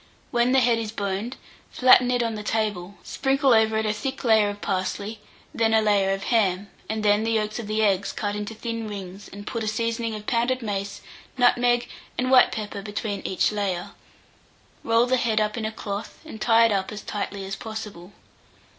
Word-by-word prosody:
When 240 Hz, 0 st, +2 dB
the 265 Hz, 0 st, +5 dB
head 235 Hz, -1 st, +3 dB
is 220 Hz, -2 st, -4 dB
boned, 200 Hz, +3 st, -3 dB, 0.3 s
flatten 255 Hz, -1 st, +5 dB
it 245 Hz, -1 st, +2 dB
on 230 Hz, -1 st, -1 dB
the 210 Hz, -, -5 dB
table, 205 Hz, -3 st, -2 dB
sprinkle 270 Hz, -1 st, +2 dB
over 220 Hz, -1 st, +3 dB
it 220 Hz, -, 0 dB
a 210 Hz, -, +1 dB
thick 265 Hz, +6 st, -4 dB
layer 220 Hz, -3 st, +4 dB
of 205 Hz, 0 st, -6 dB
parsley, 200 Hz, +4 st, -3 dB, 0.3 s
then 225 Hz, -1 st, +2 dB
a 220 Hz, -, +5 dB
layer 200 Hz, -2 st, +3 dB
of 195 Hz, 0 st, -2 dB
ham, 200 Hz, -4 st, +1 dB, 0.2 s
and 220 Hz, 0 st, -2 dB
then 205 Hz, +1 st, +4 dB
the 225 Hz, 0 st, 0 dB
yolks 215 Hz, 0 st, -1 dB
of 225 Hz, -, -6 dB
the 215 Hz, +1 st, 0 dB
eggs 200 Hz, -1 st, +2 dB
cut 205 Hz, -1 st, -3 dB
into 210 Hz, +2 st, -5 dB
thin 230 Hz, 0 st, -4 dB
rings 195 Hz, -1 st, -8 dB
and 205 Hz, +1 st, -9 dB
put 230 Hz, 0 st, -3 dB
a -, -, -3 dB
seasoning 230 Hz, +1 st, -1 dB
of 210 Hz, 0 st, -8 dB
pounded 240 Hz, +2 st, 0 dB
mace, 200 Hz, -2 st, -4 dB, 0.4 s
nutmeg, 245 Hz, -1 st, +3 dB, 0.3 s
and 255 Hz, +1 st, 0 dB
white 255 Hz, -1 st, +7 dB
pepper 205 Hz, -2 st, -5 dB
between 205 Hz, 0 st, -4 dB
each 190 Hz, -, +1 dB
layer; 195 Hz, -4 st, -2 dB, 0.9 s
roll 230 Hz, +1 st, +3 dB
the 255 Hz, +1 st, +2 dB
head 225 Hz, -3 st, +1 dB
up 215 Hz, 0 st, 0 dB
in 225 Hz, -3 st, -3 dB
a 220 Hz, -, -2 dB
cloth, 205 Hz, -1 st, -6 dB
and 220 Hz, -9 st, -10 dB
tie 230 Hz, 0 st, +5 dB
it 225 Hz, -, +2 dB
up 195 Hz, -2 st, -1 dB
as 210 Hz, -1 st, -7 dB
tightly 200 Hz, -1 st, -4 dB
as 195 Hz, 0 st, -4 dB
possible. 210 Hz, -4 st, -8 dB
215 Hz, 200 wpm, -24 LUFS, 205-230 Hz, 0.9 s, white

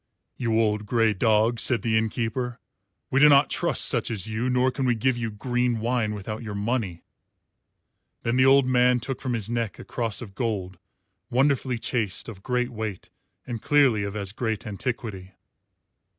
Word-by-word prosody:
"You 115 Hz, -2 st, 0 dB
old 105 Hz, -1 st, 0 dB
grey 115 Hz, -1 st, +2 dB
dog," 110 Hz, +3 st, +2 dB
said 120 Hz, +1 st, +4 dB
the 115 Hz, -2 st, +1 dB
inn 110 Hz, 0 st, +2 dB
keeper, 120 Hz, +1 st, -3 dB, 0.5 s
"we 135 Hz, -, +3 dB
do 150 Hz, +1 st, +8 dB
not 140 Hz, 0 st, +5 dB
trust -, -, +1 dB
such -, -, +1 dB
as 105 Hz, -5 st, -2 dB
you, 110 Hz, +3 st, -2 dB
nor 125 Hz, +1 st, +2 dB
can 135 Hz, +1 st, -2 dB
we 120 Hz, -, +2 dB
give 130 Hz, +3 st, +1 dB
you 120 Hz, -1 st, -3 dB
green 120 Hz, +2 st, -1 dB
wine 115 Hz, -2 st, -1 dB
without 105 Hz, +2 st, -6 dB
your 110 Hz, -3 st, -6 dB
money." 100 Hz, -5 st, -2 dB, 1.2 s
Then 115 Hz, +1 st, 0 dB
the 130 Hz, 0 st, +4 dB
old 135 Hz, 0 st, +6 dB
man 125 Hz, -1 st, +3 dB
took 130 Hz, +3 st, -4 dB
from 130 Hz, -2 st, -2 dB
his 110 Hz, -4 st, -1 dB
neck 115 Hz, -2 st, -2 dB
a -, -, -10 dB
cross 115 Hz, -4 st, -2 dB
of 105 Hz, -5 st, -9 dB
gold, 95 Hz, -5 st, -3 dB, 0.5 s
wonderfully 130 Hz, -1 st, +1 dB
chased, 110 Hz, -4 st, -2 dB
of 105 Hz, -5 st, -9 dB
great 125 Hz, +2 st, -1 dB
weight, 110 Hz, -5 st, -6 dB, 0.3 s
and 120 Hz, -3 st, -5 dB
clearly 140 Hz, -7 st, +3 dB
of 100 Hz, 0 st, -4 dB
as 100 Hz, -2 st, -4 dB
great 110 Hz, 0 st, -3 dB
antiquity. 105 Hz, -3 st, -5 dB
115 Hz, 180 wpm, -25 LUFS, 105-125 Hz, 1.2 s, do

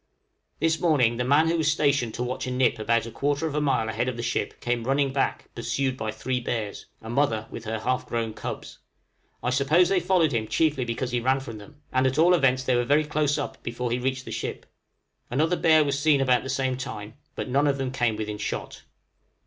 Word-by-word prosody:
This 165 Hz, +1 st, +1 dB
morning 130 Hz, -9 st, +3 dB
the 125 Hz, -, 0 dB
man 145 Hz, +5 st, +4 dB
who 170 Hz, +1 st, +1 dB
was 155 Hz, -1 st, +2 dB
stationed 140 Hz, -7 st, +1 dB
to 120 Hz, -, -2 dB
watch 125 Hz, +1 st, -3 dB
a -, -, -2 dB
nip 125 Hz, -3 st, +2 dB
about 115 Hz, +1 st, +1 dB
a 115 Hz, -, -7 dB
quarter 145 Hz, +6 st, -1 dB
of 155 Hz, -, -2 dB
a 150 Hz, -, 0 dB
mile 135 Hz, -6 st, +1 dB
ahead 110 Hz, +3 st, -1 dB
of 125 Hz, -, -5 dB
the 120 Hz, -, -4 dB
ship, 115 Hz, -1 st, -2 dB
came 120 Hz, -1 st, -1 dB
running 135 Hz, +2 st, +1 dB
back, 135 Hz, -, -1 dB
pursued 125 Hz, +3 st, -1 dB
by 110 Hz, -4 st, -4 dB
three 125 Hz, +4 st, -2 dB
bears 115 Hz, -4 st, -4 dB, 0.2 s
a 110 Hz, -, -8 dB
mother 120 Hz, -5 st, +1 dB
with 115 Hz, -, -8 dB
her 110 Hz, +1 st, -2 dB
half 125 Hz, +4 st, -1 dB
grown 115 Hz, -2 st, -2 dB
cubs. -, -, -7 dB, 0.6 s
I 125 Hz, -, 0 dB
suppose 150 Hz, +7 st, +3 dB
they 195 Hz, -1 st, +3 dB
followed 175 Hz, -3 st, +2 dB
him 110 Hz, -3 st, -1 dB
chiefly 150 Hz, -3 st, +1 dB
because 120 Hz, +2 st, -3 dB
he 120 Hz, -, +1 dB
ran 130 Hz, +3 st, +2 dB
from 115 Hz, -5 st, -8 dB
them; 145 Hz, +8 st, -15 dB
and 130 Hz, 0 st, +3 dB
at 130 Hz, +2 st, -1 dB
all 170 Hz, +3 st, +6 dB
events 130 Hz, -6 st, +3 dB
they 130 Hz, -1 st, +2 dB
were 120 Hz, -, +2 dB
very 145 Hz, +5 st, +3 dB
close 150 Hz, -1 st, 0 dB
up 145 Hz, -, -5 dB
before 120 Hz, 0 st, -3 dB
he 120 Hz, -, 0 dB
reached 130 Hz, +1 st, -2 dB
the -, -, -7 dB
ship. -, -, -4 dB, 0.6 s
Another 155 Hz, +8 st, +1 dB
bear 160 Hz, -2 st, +5 dB
was 140 Hz, -1 st, -1 dB
seen 145 Hz, -1 st, +4 dB
about 130 Hz, -2 st, +3 dB
the 130 Hz, -, -7 dB
same 130 Hz, -1 st, 0 dB
time, 110 Hz, -5 st, -6 dB, 0.2 s
but -, -, -4 dB
none 140 Hz, +3 st, +2 dB
of 140 Hz, -1 st, +1 dB
them 135 Hz, -2 st, -2 dB
came 120 Hz, -4 st, 0 dB
within 105 Hz, -1 st, -4 dB
shot. -, -, -4 dB
130 Hz, 230 wpm, -26 LUFS, 120-145 Hz, 0.6 s, all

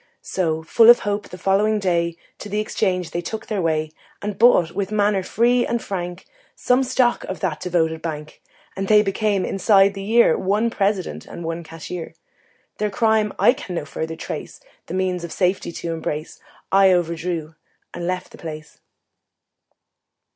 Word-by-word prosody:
So, 160 Hz, -4 st, -1 dB
full 225 Hz, +8 st, +5 dB
of 240 Hz, -, +8 dB
hope, 205 Hz, 0 st, -2 dB
the 180 Hz, -, -9 dB
following 200 Hz, +4 st, +2 dB
day 170 Hz, -4 st, 0 dB, 0.2 s
To 210 Hz, -, -8 dB
the 210 Hz, +1 st, -1 dB
exchange 185 Hz, -5 st, -1 dB
they 175 Hz, -, -2 dB
took 220 Hz, +5 st, -5 dB
their 210 Hz, -3 st, -2 dB
way 155 Hz, -2 st, 0 dB, 0.3 s
And 205 Hz, 0 st, -4 dB
bought, 210 Hz, -8 st, +5 dB
with 200 Hz, +2 st, -3 dB
manner 205 Hz, -2 st, +2 dB
free 240 Hz, +5 st, +2 dB
and 235 Hz, 0 st, -1 dB
frank, 180 Hz, -4 st, -5 dB, 0.3 s
Some 250 Hz, +1 st, +2 dB
stock 255 Hz, -1 st, +1 dB
of 190 Hz, -, -5 dB
that 165 Hz, -5 st, -1 dB
devoted 160 Hz, -3 st, 0 dB
bank; 155 Hz, -2 st, -6 dB, 0.3 s
And 195 Hz, 0 st, -3 dB
they 210 Hz, 0 st, +6 dB
became, 200 Hz, -1 st, 0 dB
inside 195 Hz, 0 st, +4 dB
the 195 Hz, -, -6 dB
year, 220 Hz, -3 st, +4 dB
One 210 Hz, +5 st, 0 dB
President 195 Hz, -4 st, -1 dB
and 170 Hz, -, -8 dB
one 165 Hz, +1 st, -4 dB
Cashier. 165 Hz, +1 st, -8 dB, 0.6 s
Their 210 Hz, 0 st, 0 dB
crime 220 Hz, 0 st, +2 dB
I -, -, +5 dB
can 225 Hz, -10 st, -7 dB
no 160 Hz, -, -3 dB
further 160 Hz, +2 st, -5 dB
trace -, -, -7 dB, 0.3 s
The -, -, -5 dB
means 185 Hz, -2 st, -1 dB
of 170 Hz, -, -6 dB
safety 185 Hz, -1 st, 0 dB
to 165 Hz, 0 st, -4 dB
embrace, 155 Hz, -1 st, -5 dB, 0.3 s
I 195 Hz, 0 st, +6 dB
overdrew 170 Hz, -2 st, -1 dB, 0.4 s
and 175 Hz, 0 st, -4 dB
left 180 Hz, 0 st, -3 dB
the -, -, -14 dB
place. 155 Hz, -2 st, -9 dB
185 Hz, 170 wpm, -22 LUFS, 170-210 Hz, 0.6 s, of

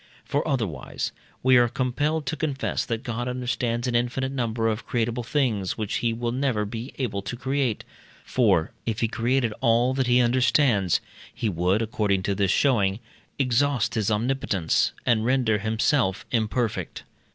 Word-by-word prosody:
For, 145 Hz, +3 st, -1 dB
otherwise, 110 Hz, -, -2 dB, 0.3 s
we 130 Hz, 0 st, +6 dB
are 120 Hz, 0 st, +5 dB
compelled 145 Hz, +6 st, -1 dB
to 160 Hz, -, -2 dB
confess 145 Hz, -3 st, -2 dB
that 115 Hz, -1 st, -3 dB
God 120 Hz, +1 st, -3 dB
understands 125 Hz, -1 st, -1 dB
an 125 Hz, -, -1 dB
infinite 125 Hz, +3 st, 0 dB
number 115 Hz, -4 st, -1 dB
of 110 Hz, +1 st, -2 dB
creatable 120 Hz, 0 st, -1 dB
things, 115 Hz, -8 st, 0 dB
which 110 Hz, -2 st, -2 dB
he 120 Hz, -, 0 dB
will 120 Hz, +1 st, -2 dB
never 125 Hz, -4 st, 0 dB
be 115 Hz, +5 st, -6 dB
able 115 Hz, -7 st, -2 dB
to 95 Hz, +4 st, -5 dB
create, 130 Hz, -2 st, -1 dB, 0.4 s
for, 80 Hz, -, +2 dB, 0.2 s
if 110 Hz, -2 st, -1 dB
he 115 Hz, -, +3 dB
created 120 Hz, +1 st, 0 dB
all 120 Hz, +1 st, +3 dB
that 130 Hz, -1 st, 0 dB
he 125 Hz, 0 st, +4 dB
understands, 120 Hz, -, +3 dB, 0.3 s
he 110 Hz, -, -2 dB
would, 90 Hz, +4 st, +1 dB
according 105 Hz, -4 st, 0 dB
to 100 Hz, -, 0 dB
this 100 Hz, 0 st, +1 dB
showing, 100 Hz, -4 st, +2 dB, 0.4 s
exhaust 135 Hz, -1 st, +1 dB
his 110 Hz, -2 st, 0 dB
omnipotence, 105 Hz, -6 st, +1 dB
and 110 Hz, -3 st, +3 dB
render 120 Hz, -3 st, +2 dB
himself 110 Hz, 0 st, +1 dB
imperfect. 115 Hz, 0 st, -1 dB
120 Hz, 155 wpm, -25 LUFS, 110-130 Hz, 0.4 s, we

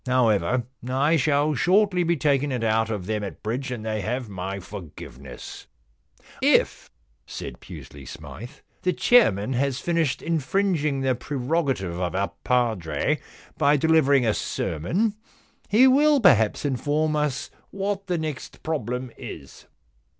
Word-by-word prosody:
However, 125 Hz, -2 st, +2 dB, 0.3 s
I 140 Hz, +5 st, +2 dB
shall 150 Hz, 0 st, +2 dB
shortly 185 Hz, +3 st, +3 dB
be 170 Hz, 0 st, +1 dB
taking 140 Hz, -1 st, +1 dB
it 125 Hz, -3 st, -2 dB
out 110 Hz, 0 st, +1 dB
of 105 Hz, -5 st, -3 dB
them 105 Hz, +1 st, -2 dB
at 100 Hz, -, -7 dB
bridge, 120 Hz, +5 st, -3 dB
and 120 Hz, -3 st, -5 dB
they 110 Hz, -1 st, -2 dB
have 120 Hz, +3 st, -3 dB
my 95 Hz, 0 st, -5 dB
forgiveness.* 85 Hz, -, -10 dB, 0.3 s
* -, -, -24 dB, 0.2 s
If,* -, -, -5 dB, 0.4 s
said -, -, -7 dB
Pusely 70 Hz, -2 st, -11 dB
Smythe, 115 Hz, -, -10 dB
* -, -, -41 dB
the 180 Hz, -, +1 dB
chairman 130 Hz, -, +4 dB
has 135 Hz, +1 st, 0 dB
finished 165 Hz, -6 st, 0 dB
infringing 160 Hz, -2 st, 0 dB
the 130 Hz, -1 st, +2 dB
prerogative 130 Hz, -, -2 dB
of 90 Hz, -1 st, -2 dB
our 100 Hz, +1 st, 0 dB
padre 115 Hz, -10 st, 0 dB, 0.4 s
by 145 Hz, +1 st, +4 dB
delivering 140 Hz, -4 st, +4 dB
a 110 Hz, -, +2 dB
sermon, 180 Hz, -, -1 dB, 0.6 s
he 225 Hz, +6 st, +6 dB
will 290 Hz, +3 st, +5 dB
perhaps 125 Hz, -, +4 dB
inform 145 Hz, +3 st, 0 dB
us 150 Hz, -3 st, -1 dB, 0.2 s
what 195 Hz, 0 st, -3 dB
the 180 Hz, -2 st, 0 dB
next 155 Hz, -4 st, -6 dB
problem 125 Hz, -5 st, -3 dB
is.' 70 Hz, -4 st, -10 dB
130 Hz, 140 wpm, -24 LUFS, 110-160 Hz, 0.6 s, he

